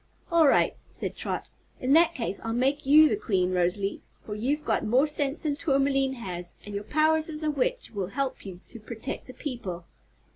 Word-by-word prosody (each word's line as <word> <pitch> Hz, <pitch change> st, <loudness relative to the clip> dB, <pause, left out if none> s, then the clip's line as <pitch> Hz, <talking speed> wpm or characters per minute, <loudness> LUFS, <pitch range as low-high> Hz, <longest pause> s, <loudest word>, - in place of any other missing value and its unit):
"All 330 Hz, -3 st, +5 dB
right," -, -, +3 dB
said -, -, -5 dB
Trot. -, -, -4 dB, 0.3 s
"In 255 Hz, +2 st, +1 dB
that 335 Hz, +1 st, +5 dB
case 230 Hz, -7 st, -3 dB
I'll 225 Hz, -, -2 dB
make 270 Hz, +4 st, 0 dB
you 305 Hz, +2 st, +8 dB
the -, -, +1 dB
Queen, 190 Hz, -, 0 dB
Rosalie, 185 Hz, +2 st, 0 dB, 0.2 s
for 210 Hz, -, -5 dB
you've 275 Hz, +8 st, -1 dB
got -, -, +1 dB
more 250 Hz, +6 st, +3 dB
sense 295 Hz, -1 st, 0 dB
than 295 Hz, -2 st, 0 dB
Tourmaline 275 Hz, -3 st, +1 dB
has 180 Hz, -8 st, -6 dB
and 205 Hz, -, -8 dB
your 200 Hz, +1 st, -4 dB
powers 315 Hz, +3 st, +3 dB
as 310 Hz, 0 st, -4 dB
a 305 Hz, -, +1 dB
witch 295 Hz, -, -1 dB
will 195 Hz, -4 st, -3 dB
help 270 Hz, +7 st, -3 dB
you 185 Hz, -3 st, -9 dB
to 235 Hz, -, -9 dB
protect 225 Hz, +4 st, -7 dB
the 255 Hz, -, -9 dB
people." 195 Hz, -, -5 dB
265 Hz, 195 wpm, -27 LUFS, 205-300 Hz, 0.3 s, you